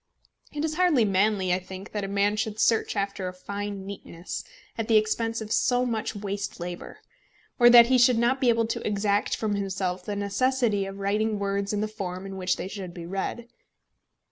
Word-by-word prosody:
It 295 +1 -2
is 310 0 -3
hardly 340 -11 +4
manly, 195 -1 +2
I 180 - +1
think, 190 +2 -10
that 210 -1 -3
a - - -2
man 200 +1 +1
should 215 0 -3
search 225 0 +2
after 200 -2 -2
a 180 - -5
fine 200 +1 -5
neatness 185 -3 -7 0.3
at 225 -1 -3
the 225 - +5
expense 225 +1 0
of 215 -1 -7
so 250 +1 +2
much 225 -2 -2
waste 200 -1 -4
labour; 175 0 -7 0.6
or 240 0 +8
that 240 -1 +9
he 255 +1 +3
should 245 0 +5
not 245 +4 +2
be 250 - +4
able 230 -1 +3
to 225 - -3
exact 205 0 +1
from 215 -2 -1
himself 190 -2 -2
the 205 +2 -4
necessity 205 0 +1
of 195 0 -7
writing 210 +2 0
words 200 0 -1
in 210 -1 -1
the 215 - 0
form 195 -3 -6
in 195 0 -7
which 185 -1 0
they - - -5
should 190 -3 -7
be 170 -2 -7
read. 195 +6 -4
205 Hz, 200 wpm, -26 LUFS, 195-225 Hz, 0.6 s, that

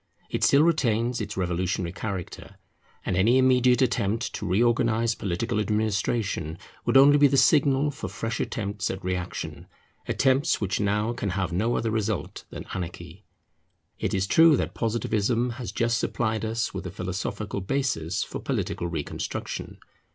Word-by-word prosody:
It - - -1
still 140 +2 +6
retains 120 -7 +1
its 105 -1 -5
revolutionary 90 -1 -1
character; 95 -2 -6 0.5
and 95 - 0
any 110 +8 +4
immediate 130 0 +4
attempt 115 -1 0
to 105 - -4
reorganize 115 +3 +2
political 105 +4 -2
administration 105 -5 -1 0.3
would 120 +3 +4
only 145 +2 +7
be 145 - +7
the 140 0 +1
signal 140 +1 +4
for 140 - -6
fresh 110 +4 -4
attempts 100 -1 -2
at 95 - -5
reaction, 90 -1 -4 0.4
attempts 135 +1 +2
which 100 -2 -1
now 105 +3 0
can 110 -4 -3
have 90 -2 -2
no 110 +7 +1
other 115 - -1
result 110 -2 -2
than - - -8
anarchy. 90 +1 -7 0.7
It - - -1
is 95 -1 +1
true 160 +7 +6
that - - -2
Positivism 115 +1 0
has 120 - -4
just 115 0 +1
supplied 110 -2 -1
us 115 +1 -2
with 90 - -5
a - - -6
philosophical 100 +2 -4
basis 95 - -1
for - - -6
political 85 - -2
reconstruction. 80 -4 -5
110 Hz, 150 wpm, -26 LUFS, 95-120 Hz, 0.7 s, only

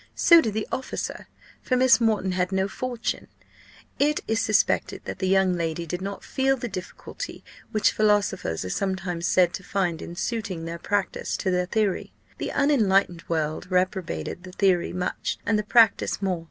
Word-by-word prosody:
So 335 -1 +7
did 220 -6 -3
the 215 - -2
officer; 260 - -4 0.3
for 255 - 0
Miss 255 -1 +5
Moreton 215 -4 +2
had 180 0 0
no 190 0 +1
fortune. 245 +3 -4 0.7
It 295 +1 +2
is 225 0 +1
suspected 215 - +1
that - - -6
the 190 - 0
young 190 -1 +3
lady 170 -1 -2
did 180 +3 -4
not 200 +1 -5
feel 270 0 +1
the 245 - -4
difficulty, 185 - -7 0.3
which 215 - +3
philosophers 205 - +1
are 90 - -4
sometimes 185 - -2
said 180 -1 +3
to 190 - -6
find 180 -5 -1
in 170 - -7
suiting 200 -5 -3
their 170 +1 -5
practice 200 +1 -1
to 190 - -1
their 180 0 0
theory. 210 -3 -1 0.3
The - - -3
unenlightened 200 - +2
world 160 +1 -2
reprobated 180 - -1
the 185 0 -11
theory 185 -3 +2
much, 180 0 -3
and 215 0 +2
the - - -1
practice 225 0 +4
more. 190 -3 -1
190 Hz, 170 wpm, -25 LUFS, 180-220 Hz, 0.7 s, So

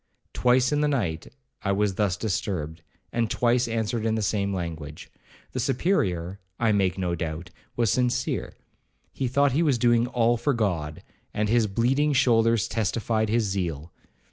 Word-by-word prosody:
Twice 125 +1 +3
in 150 0 +1
the 150 - +2
night, 95 - -1 0.3
I 100 - 0
was 100 0 +1
thus 100 -3 0
disturbed, 85 -6 -3 0.3
and 115 -2 0
twice 120 +1 +2
answered 115 0 -2
in 110 0 +1
the 110 - -1
same 100 -1 0
language. 80 -5 -6 0.4
The 130 - -3
Superior, 100 - 0 0.2
I 115 -2 +3
make 95 -3 +1
no 90 -2 -1
doubt, 85 +2 -5 0.2
was 115 -4 +2
sincere. 125 -1 -1 0.6
He 130 - -2
thought 140 +3 +2
he 145 +6 +1
was 145 -7 +2
doing 120 0 +3
all 120 -1 +2
for 140 +3 0
God, 85 -9 -2 0.3
and 105 0 0
his 115 -1 +3
bleeding 130 +9 +1
shoulders 115 -5 +3
testified 110 +1 -1
his 115 +1 +2
zeal. 85 -6 -3
110 Hz, 160 wpm, -25 LUFS, 95-120 Hz, 0.6 s, Twice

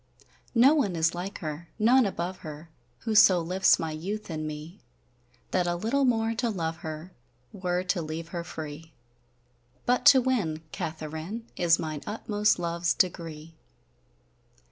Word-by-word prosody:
None 250 - +5
is 165 0 +2
like 180 +3 -5
her, 155 +1 -5
none 235 +2 +5
above 185 -1 -3
her, 155 +1 -10 0.3
Who 225 - -2
so 190 -4 +7
lifts 180 +3 +3
my 160 -1 -3
youth 190 +6 -5
in 155 -1 -3
me, 155 +4 -8 0.7
That 180 -1 +1
a 175 - 0
littel 235 +10 +1
more 225 -2 +2
to 235 +1 -1
love 165 -6 -2
her 160 +3 -7 0.4
Were 180 -1 -1
to 180 -1 0
leave 160 +1 -5
her 170 -1 -4
free! 160 0 -8 0.9
But 250 +1 +3
to 270 - +9
winne 210 -12 0
Katheryn, 160 +5 -5
Is 170 -1 +4
mine 155 -2 -4
utmost 210 -1 +1
love's 170 0 0
degree. 165 -3 -2
175 Hz, 145 wpm, -28 LUFS, 160-210 Hz, 0.9 s, to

